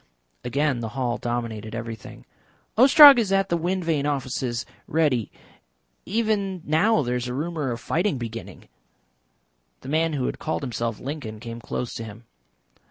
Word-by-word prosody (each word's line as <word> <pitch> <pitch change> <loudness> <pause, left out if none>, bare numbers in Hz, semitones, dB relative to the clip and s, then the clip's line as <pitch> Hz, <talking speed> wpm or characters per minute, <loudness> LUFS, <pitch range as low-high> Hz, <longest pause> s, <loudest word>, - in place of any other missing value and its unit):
Again 140 0 0
the 115 -1 -4
hall 120 -2 -1
dominated 115 -2 -4
everything. 115 -2 -8 0.5
"Ostrog 275 +2 +9
is 210 -4 0
at 195 0 +2
the 170 - +2
wind 175 +2 -1
vane 150 -3 0
offices 130 -4 -2 0.2
ready. 140 -9 +1 0.8
Even 200 -4 -1
now 170 +7 +3
there 125 0 -1
is 125 0 -4
a 125 - -4
rumour 155 -1 -2
of 120 -1 -3
fighting 170 - 0
beginning." 115 -1 -8 1.1
The - - -9
man 160 +2 +1
who 135 -4 -1
had - - -3
called 155 -2 -3
himself 115 -3 -3
Lincoln 125 -6 -6
came 115 0 -8
close 120 +1 -4
to 115 - -5
him. 110 +1 -10
135 Hz, 155 wpm, -24 LUFS, 120-170 Hz, 1.1 s, Ostrog